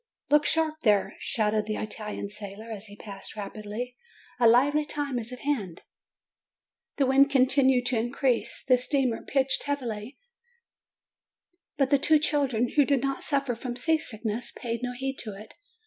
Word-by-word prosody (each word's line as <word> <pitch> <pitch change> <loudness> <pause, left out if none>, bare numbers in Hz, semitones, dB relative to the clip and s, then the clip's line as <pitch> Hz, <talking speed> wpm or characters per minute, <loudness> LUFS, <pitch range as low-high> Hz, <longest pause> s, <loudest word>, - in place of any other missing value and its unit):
"Look 295 0 +5
sharp 315 -1 +2
there!" 205 -3 +2
shouted 215 -1 0
the 215 - -1
Italian 210 -1 -5
sailor, 210 +2 -8
as 215 0 -7
he 205 - -11
passed 200 -1 -8
rapidly; 215 +4 -6 0.4
"a 235 - +6
lively 280 +6 +4
time 290 -4 -2
is 235 +1 -8
at 250 - -8
hand!" 215 - -2 1.1
The 280 - +3
wind 275 +2 +5
continued 260 -2 +4
to 245 -2 +1
increase, 240 -1 0
the 255 -1 +5
steamer 255 -2 0
pitched 270 -1 +1
heavily; 250 -4 -4 1.6
but 275 -2 +1
the 280 - +5
two 310 +3 +5
children, 275 -6 +1
who 295 - +4
did 275 -2 +1
not 275 0 -1
suffer 275 -4 0
from 240 +1 -5
seasickness, 245 -6 -1
paid 230 -1 -4
no 250 0 -3
heed 270 +1 -3
to 215 -4 -5
it. 215 - -12
250 Hz, 155 wpm, -27 LUFS, 220-275 Hz, 1.6 s, a